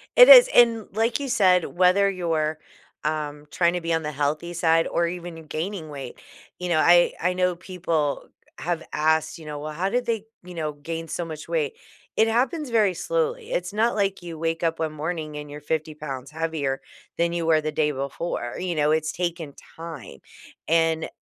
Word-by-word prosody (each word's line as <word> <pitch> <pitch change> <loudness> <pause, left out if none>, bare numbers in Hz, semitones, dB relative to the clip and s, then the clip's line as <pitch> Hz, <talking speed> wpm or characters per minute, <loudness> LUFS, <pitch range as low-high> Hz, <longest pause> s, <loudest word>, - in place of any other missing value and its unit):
It - - +9
is, - - +11
and 230 -3 +5
like 225 +3 +1
you 280 -1 -4
said, 185 -6 +4
whether 185 +3 +3
you're, 160 -4 -1 0.5
um, 150 -1 -3
tryna 175 0 +1
be 165 0 -1
on 165 0 0
the 150 - -3
healthy 150 +4 -2
side 165 -1 +3
or 170 0 +1
even 170 -2 -7
gaining 165 +1 -4
weight, 135 -4 -8 0.4
you 180 - -3
know, 165 -2 +3
I 175 +2 +5
I 180 +1 +1
know 180 -1 +1
people, 170 -5 -2 0.4
eh, - - -8
have 170 -1 -2
asked, 160 +2 +1
you 160 - -12
know, 150 -1 -6
"Well, 155 +1 -5
how 175 +5 -2
did 245 +3 0
they, 225 -3 -2 0.2
you 180 0 -10
know, 155 -3 -3
gain 165 +3 -6
so 175 - -3
much 160 -2 -8
weight?" 465 -2 -1 0.4
It 220 - +5
happens 260 +6 0
very 215 -5 +3
slowly, 485 - -2
it's - - -2
not 225 +3 +1
like 195 -2 0
you 170 -2 -8
wake 165 0 -2
up 165 -1 0
one 160 -1 -1
morning 155 0 -4
and 150 0 -7
you're 145 +1 -9
50 155 +1 -2
pounds 140 -3 -7
heavier, 155 -4 -2 0.4
than 170 0 +1
you 170 -1 -2
were 160 -1 +4
the 155 0 -2
day 150 -1 +1
before, 140 -2 -4
you 180 -2 -2
know, 150 0 +2
it's 155 0 0
taking 170 -4 -3 0.2
time, 160 - -9 0.5
and 165 -1 +2
165 Hz, 195 wpm, -24 LUFS, 155-185 Hz, 0.5 s, is